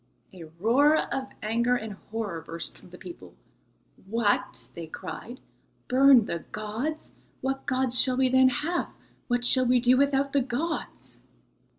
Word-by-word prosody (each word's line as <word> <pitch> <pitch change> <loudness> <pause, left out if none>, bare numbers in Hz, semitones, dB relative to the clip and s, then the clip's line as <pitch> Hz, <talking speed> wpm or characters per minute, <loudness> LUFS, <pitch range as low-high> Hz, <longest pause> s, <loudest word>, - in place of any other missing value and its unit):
A 175 -3 -10
roar 280 - +4 0.2
of 265 -1 -3 0.2
anger 235 +3 +1
and 220 -3 -5 0.2
horror 210 -7 -4
burst 165 +1 -7
from - - -17
the 180 - -12
people. 345 - -11 0.7
"What!" 205 - 0
they 170 -1 -8
cried, 220 +9 -8 0.5
"burn 260 -2 +6
the 170 - -3
gods! 225 +9 -4 0.3
What 270 +1 -3
gods 255 -1 +2
shall 255 -1 +2
we 260 0 +3
then 260 0 +5
have? 315 +7 -2 0.4
What 245 -1 0
shall 255 0 +5
we 250 0 +4
do 250 +1 +4
without 275 0 +1
the 280 - +3
gods?" 270 +7 -4
250 Hz, 150 wpm, -27 LUFS, 215-270 Hz, 0.7 s, burn